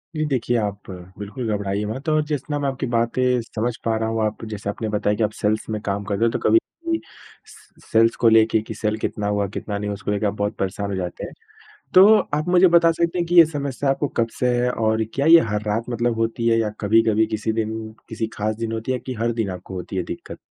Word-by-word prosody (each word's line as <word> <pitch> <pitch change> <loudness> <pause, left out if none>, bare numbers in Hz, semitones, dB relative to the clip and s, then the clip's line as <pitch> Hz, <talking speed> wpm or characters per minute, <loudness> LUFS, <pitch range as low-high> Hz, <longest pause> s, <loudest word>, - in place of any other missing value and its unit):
जी, 155 - 0
देखिए 125 -4 0
आप 105 -2 -3 0.3
बिल्कुल 105 +4 -5
घबराइए 100 +1 -2
मत 130 +8 -4
और 155 0 +3
जितना 145 0 -3
मैं 140 - -1
आपकी 135 0 -4
बातें 120 +1 +1
समझ 115 +1 -3
पा 115 -1 +1
रहा 110 0 -1
हूँ, 115 0 -1
आप 110 +1 -4
जैसे 105 -2 -5
आपने 110 +1 -3
बताया 105 0 0
कि 115 - 0
आप 105 - 0
सेल्स 110 0 -1
में 110 -1 -2
काम 100 0 -2
कर 100 0 -1
रहे 115 - +2
हो, 115 - +2
तो - - -2
कभी 340 - +4 0.3
भी 330 0 +1 0.5
स - - -15 0.2
स - - -20
सेल्स 115 +1 +4
को 115 - +4
लेके 110 0 +4
कि 110 - -7
सेल 105 +1 -1
कितना 105 -1 -3
हुआ, 105 -1 0
कितना 100 +1 -5
नहीं 105 0 -4
हुआ - - -2
उसको 100 0 -4
लेके 105 +1 -1
आप 100 - +1
बहुत 105 +1 -2
परेशान 100 +1 -3
हो 100 - -2
जाते 90 -2 -4
हैं। - - -10 0.6
तो 185 +2 +9 0.3
आप 150 +2 0
मुझे 180 +1 +6
बता 170 -1 +5
सकते 170 +2 -1
हैं 170 - 0
कि 175 - 0
ये 170 -2 +10
समस्या 140 -3 -3
आपको 140 +2 0
कब 115 -3 -1
से 125 - +2
है? 125 0 +1
और 110 -1 0
क्या 140 - 0
ये 165 +1 +9
हर 105 0 -1
रात 115 +2 -1
मतलब 120 0 0
होती 115 +1 -1
है 115 -1 +4
या 110 - 0
कभी-कभी 110 +1 +3
किसी 110 0 -2
दिन, 110 0 -3 0.2
किसी 110 0 -3
खास 110 +1 -2
दिन 115 0 -4
होती 115 +3 -3
है 125 - -1
कि 130 - -6
हर 115 +1 +1
दिन 110 -4 -2
आपको 90 +1 -8
होती 90 +1 -6
है 90 - 0
दिक्कत? - - -8
110 Hz, 255 wpm, -22 LUFS, 105-125 Hz, 0.6 s, ये